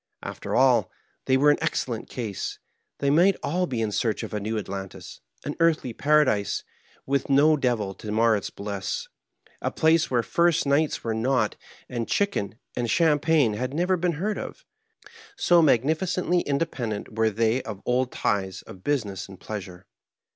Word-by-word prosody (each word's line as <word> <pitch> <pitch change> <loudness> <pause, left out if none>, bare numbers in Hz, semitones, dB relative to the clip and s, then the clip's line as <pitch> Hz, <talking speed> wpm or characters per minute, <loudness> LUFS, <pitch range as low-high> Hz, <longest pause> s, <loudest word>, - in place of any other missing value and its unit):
After - - -4
all, - - +4 0.4
they 130 - +3
were 145 +2 +5
in 145 - 0
excellent 125 -8 -2
case. 110 -6 -4 0.4
They 140 0 +1
might 175 +6 +5
all 180 +4 0
he 120 -6 -2
in 110 -2 -1
search 110 +1 -1
of - - -6
a 105 - -1
new 110 +2 -2
Atlantis— 95 -2 -7 0.2
an - - -3
earthly 160 -7 +2
paradise 140 -8 +2 0.4
with 140 0 0
no 140 +3 +5
(printer's) 155 -2 +2
devil 110 -7 0
to 105 +2 -7
mar 115 +1 +4
its 100 - -3
hliss, 100 -2 -4 0.5
a - - 0
place 160 +1 +3
where 120 -2 +1
first 170 +2 +2
nights 145 +2 +1
were 115 - -1
not, 115 -1 +1 0.3
and 120 -2 -3
chicken 150 - 0 0.2
and 120 -1 -1
champagne 150 -3 +3
had 130 +6 -3
never 180 +3 +2
heen 175 -1 0
heard 205 +7 -2
of— - - -8 0.7
so 175 - +4
magnificently 160 +6 +2
independent 130 -8 -3
were 110 0 +3
they 115 +4 +1
of 105 -5 -7
old 125 +1 +1
ties 95 -2 -1
of - - -11
husiness 105 -10 -2
and 95 - -12
pleasure. 95 -4 -7
125 Hz, 165 wpm, -25 LUFS, 110-155 Hz, 0.7 s, were